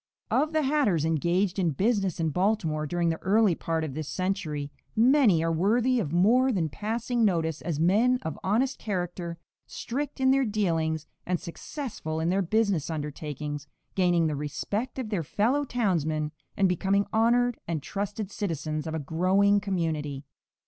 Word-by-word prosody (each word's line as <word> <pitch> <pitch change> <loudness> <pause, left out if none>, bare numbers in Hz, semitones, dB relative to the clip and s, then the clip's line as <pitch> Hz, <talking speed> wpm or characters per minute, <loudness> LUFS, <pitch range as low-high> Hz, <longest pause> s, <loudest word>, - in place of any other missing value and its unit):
No. - - +4
6. - - -9
Of - - -15
the 315 - +3
hatters 265 - +2
engaged 175 +5 +1
in 175 -3 +2
business 195 - 0
in 160 -1 +1
Baltimore 175 -5 0
during 170 +1 0
the 160 - -2
early 205 0 +4
part 165 0 -2
of 150 -4 -4
this 155 0 -4
century, 155 -6 -2 0.2
many 230 - +5
are 165 - +1
worthy 230 +9 +2
of 155 -10 -2
more 235 +9 +4
than 170 -8 0
passing 230 - -1
notice 165 -6 +1
as 160 -4 -3
men 215 +10 +4
of 160 - -4
honest 245 +8 +1
character, 175 -4 -3 0.3
strict 280 +4 -4
in 260 0 +4
their 270 0 +3
dealings 165 - 0 0.2
and 180 -1 -1
successful 170 - -5
in 165 +1 0
their 190 +2 +2
business 200 -4 +1
undertakings, 150 -1 -5 0.3
gaining 175 -3 +3
the 155 -2 0
respect 200 - -3
of 255 -5 -3
their 200 -5 0
fellow 230 - +1
townsmen 160 - 0 0.3
and 195 - +4
becoming 195 +3 +1
honored 235 +2 +3
and 160 -4 -2
trusted 205 +2 -4
citizens 155 -5 -3
of 160 - -3
a - - -1
growing 185 +7 +3
community. 160 -8 -2
185 Hz, 165 wpm, -27 LUFS, 160-220 Hz, 0.3 s, many